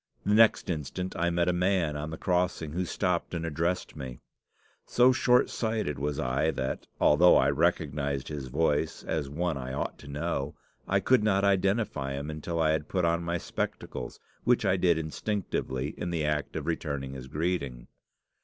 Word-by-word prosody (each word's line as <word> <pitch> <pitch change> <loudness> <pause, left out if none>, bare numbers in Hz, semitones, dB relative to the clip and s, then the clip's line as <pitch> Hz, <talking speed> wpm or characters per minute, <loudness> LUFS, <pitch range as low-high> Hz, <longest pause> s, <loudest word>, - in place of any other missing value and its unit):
The 105 - +2
next 110 0 +5
instant 85 +4 -4
I 85 +1 +1
met 85 0 +1
a 90 - +3
man 90 -4 +1
on 75 +1 -4
the 80 - -6
crossing, 90 -4 0
who 90 +3 -1
stopped 90 0 -1
and 85 0 -2
addressed 85 +3 -1
me. 65 -2 -6 0.7
So 125 +1 +5
short 125 0 +4
sighted 110 - -1
was 75 +1 -2
I 70 +2 +1
that, 65 -4 -3
although 85 +4 +6
I - - +4
recognised 70 -3 0
his 70 -4 -5
voice 75 +3 0
as 75 -4 -2
one 80 +1 -1
I 65 0 -5
ought - - -3
to 70 - -12
know, 75 -1 -3 0.3
I - - +2
could 130 -4 +4
not 100 -2 +2
identify 95 -7 +1
him 70 +2 -4
until 80 +2 -4
I 80 -1 +3
had 80 -1 -1
put 90 -3 +1
on 85 0 +2
my 85 +1 -1
spectacles, - - -5 0.2
which - - +3
I 90 - +3
did 90 -3 +3
instinctively 80 -5 -2
in 85 - -5
the 80 -3 -1
act 75 -1 -1
of 75 - -3
returning 70 -5 -3
his 65 -1 -8
greeting. 70 -5 -2
80 Hz, 180 wpm, -29 LUFS, 70-90 Hz, 0.7 s, although